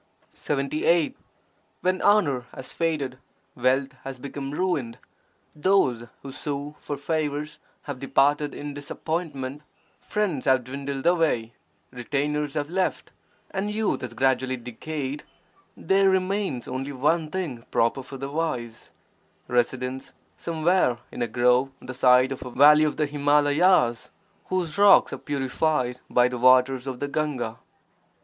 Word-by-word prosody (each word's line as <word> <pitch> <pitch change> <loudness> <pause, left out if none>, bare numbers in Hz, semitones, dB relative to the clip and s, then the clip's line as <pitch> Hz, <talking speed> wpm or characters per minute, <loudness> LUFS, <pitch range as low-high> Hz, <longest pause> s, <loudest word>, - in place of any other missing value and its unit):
When 155 +5 -1
honour 150 - +3
has 130 - -7
faded, 145 -6 -2 0.3
wealth 130 +2 +1
has 135 -1 -6
become 135 +1 -6
ruined, 150 -7 -1 0.6
those 150 -9 +2 0.2
who 135 - -7
sue 145 +1 -4
for 145 - -5
favours 150 0 -2 0.2
have 145 -3 -6
departed 145 +2 +2
in 145 0 -6
disap 145 0 -8
pointment, 150 -4 -3 0.4
friends 190 -11 -2
have 130 -2 +3
dwindled 135 +1 -5
away, 160 -10 +2 0.4
retainers 145 +4 -2
have 145 -1 -1
left, 185 +3 -2 0.4
and 195 +2 -2
youth 220 -1 0
has 120 -2 -6
gradually 130 0 +1
decayed, 135 +4 -5 0.5
there 195 +2 +3
remains 190 - 0
only 130 +2 -4
one 150 +4 +1
thing 155 -10 -4
proper 115 +4 +1
for 135 +1 -9
the 135 +1 -5
wise 125 -8 -3 0.3
— - - -40
residence 125 +2 -1 0.2
somewhere 165 -5 +1
in - - -6
a 120 - +1
grove 125 +3 +3
on - - -15
the 130 - -6
side 130 0 +4
of 135 - -5
a 125 - -7
valley 150 +4 +6
of 150 - -1
the 155 - +2
Himalayas 145 -1 +3 0.4
whose 180 -2 -2
rocks 205 -1 +6
are - - -5
purified 135 -2 -1
by 125 0 +4
the 125 -1 -4
waters 130 +1 +4
of 130 -2 -4
the 145 - -2
Gahga. 140 -6 -2
140 Hz, 135 wpm, -25 LUFS, 130-155 Hz, 0.6 s, valley